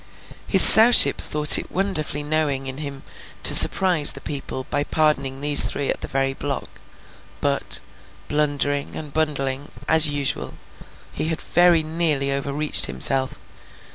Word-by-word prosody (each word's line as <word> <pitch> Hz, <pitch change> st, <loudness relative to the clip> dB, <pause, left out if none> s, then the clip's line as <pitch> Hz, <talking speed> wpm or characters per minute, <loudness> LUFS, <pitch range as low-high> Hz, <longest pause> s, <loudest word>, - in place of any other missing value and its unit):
His -, -, +6 dB
Sowship 230 Hz, +2 st, +7 dB
thought 150 Hz, 0 st, +5 dB
it -, -, -11 dB
wonderfully 155 Hz, -6 st, -3 dB
knowing 145 Hz, -3 st, -4 dB
in 130 Hz, +1 st, -8 dB
him 140 Hz, -2 st, -9 dB, 0.4 s
to -, -, +5 dB
surprise 175 Hz, -6 st, +4 dB
the 135 Hz, -, -11 dB
people 135 Hz, -2 st, -7 dB
by 145 Hz, -, -2 dB
pardoning 140 Hz, -4 st, -3 dB
these 145 Hz, 0 st, +5 dB
three 140 Hz, -, -5 dB
at -, -, -5 dB
the -, -, -7 dB
very 135 Hz, 0 st, -3 dB
block; 140 Hz, 0 st, -8 dB, 0.6 s
but, -, -, -3 dB, 0.5 s
blundering, 145 Hz, -1 st, -3 dB
and 150 Hz, -3 st, -10 dB
bungling, 145 Hz, -3 st, -4 dB, 0.2 s
as 160 Hz, -1 st, +2 dB
usual, 145 Hz, -2 st, -5 dB, 0.6 s
he -, -, -5 dB
had 160 Hz, -1 st, -4 dB
very 175 Hz, -2 st, +1 dB
nearly 155 Hz, -4 st, -3 dB
overreached 140 Hz, +2 st, +2 dB
himself. 130 Hz, -, -2 dB
145 Hz, 140 wpm, -19 LUFS, 140-155 Hz, 0.6 s, Sowship